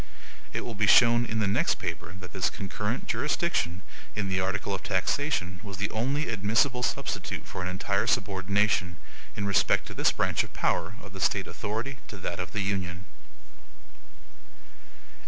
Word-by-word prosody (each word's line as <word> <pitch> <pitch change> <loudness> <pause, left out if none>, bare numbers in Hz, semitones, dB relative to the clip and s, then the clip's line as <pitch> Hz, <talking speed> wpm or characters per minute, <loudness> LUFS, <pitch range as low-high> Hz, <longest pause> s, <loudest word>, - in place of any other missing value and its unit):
It - - -2
will 120 - -5
be 105 -1 +1
shown 120 +2 +7
in 115 - -2
the 110 -2 +2
next 100 - +2
paper - - -4
that 90 -1 -10
this 95 -2 +1
CONCURRENT 105 +4 -3
JURISDICTION 100 - 0 0.3
in 100 -2 -1
the 95 0 +1
article 95 +1 -1
of 95 - -2
taxation 95 - 0
was 100 -3 -7
the 100 +1 -1
only 135 +7 0
admissible 115 +4 +2
substitute 125 - -2
for - - -6
an 90 - -2
entire 90 0 0
subordination, 100 -1 +2 0.4
in 100 - -2
respect 100 -1 +3
to - - -7
this - - +3
branch - - +1
of - - -11
power, 90 +5 0
of 100 -2 -11
the 95 - -7
State - - +2
authority 115 +6 -4
to 105 - -8
that 85 -2 -4
of 90 -1 -4
the 105 - -1
Union. 95 -2 -2
100 Hz, 165 wpm, -28 LUFS, 95-110 Hz, 0.4 s, shown